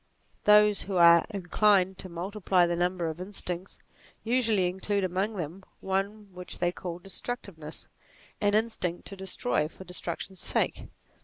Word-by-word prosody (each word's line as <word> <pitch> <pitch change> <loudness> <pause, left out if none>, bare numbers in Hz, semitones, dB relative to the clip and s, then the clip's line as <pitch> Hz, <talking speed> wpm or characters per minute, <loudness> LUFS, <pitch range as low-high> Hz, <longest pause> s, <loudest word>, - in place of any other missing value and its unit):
Those 210 -1 +6
who 195 -2 -2
are 170 -1 +7
inclined 195 -1 +2
to 185 - -7
multiply 180 +1 +1
the 170 0 0
number 175 0 0
of 160 +2 -5
instincts, 185 -1 -4 0.5
usually 225 -5 +2
include 190 +2 -1
among 190 +4 -1
them 175 +1 -5 0.2
one 195 +1 -3
which 180 0 -6
they 175 0 +1
call 175 -1 -6
destructive 195 0 -5
ness: 155 0 -8 0.5
an 205 0 +3
instinct 215 -6 -1
to 195 - -7
destroy 190 -3 0
for 180 - -12
destruction's 180 +1 -6
sake. - - 0
190 Hz, 145 wpm, -28 LUFS, 175-205 Hz, 0.5 s, are